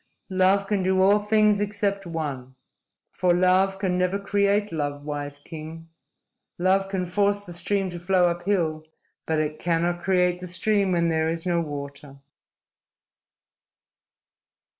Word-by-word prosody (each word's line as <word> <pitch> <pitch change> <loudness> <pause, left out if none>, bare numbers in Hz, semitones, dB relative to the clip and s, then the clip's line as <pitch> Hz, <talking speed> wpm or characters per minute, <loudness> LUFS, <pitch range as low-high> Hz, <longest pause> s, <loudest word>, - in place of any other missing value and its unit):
"Love 190 +1 +3
can 200 -1 0
do 190 0 +1
all 200 +2 +5
things 210 -1 +3
except 200 -2 -2
one. 140 -6 -5 0.6
For 180 -1 +1
love 185 +2 +3
can 185 -2 -1
never 180 +2 +1
create 200 0 0
love, 145 -2 -3
wise 145 -1 -5
king. 160 +2 -10 0.7
Love 190 +2 +2
can 190 -2 -2
force 205 +2 0
the 175 - -8
stream 195 +2 0
to 175 - -7
flow 180 +1 +2
up 175 0 0
hill, 160 -6 0 0.4
but 160 - 0
it 155 0 -2
cannot 175 +1 0
create 180 -1 +1
the 180 - -7
stream 195 +1 +1
when 170 -1 +2
there 160 0 +1
is 165 +1 -3
no 175 -2 +1
water." 140 -2 -7
180 Hz, 140 wpm, -24 LUFS, 160-195 Hz, 0.7 s, all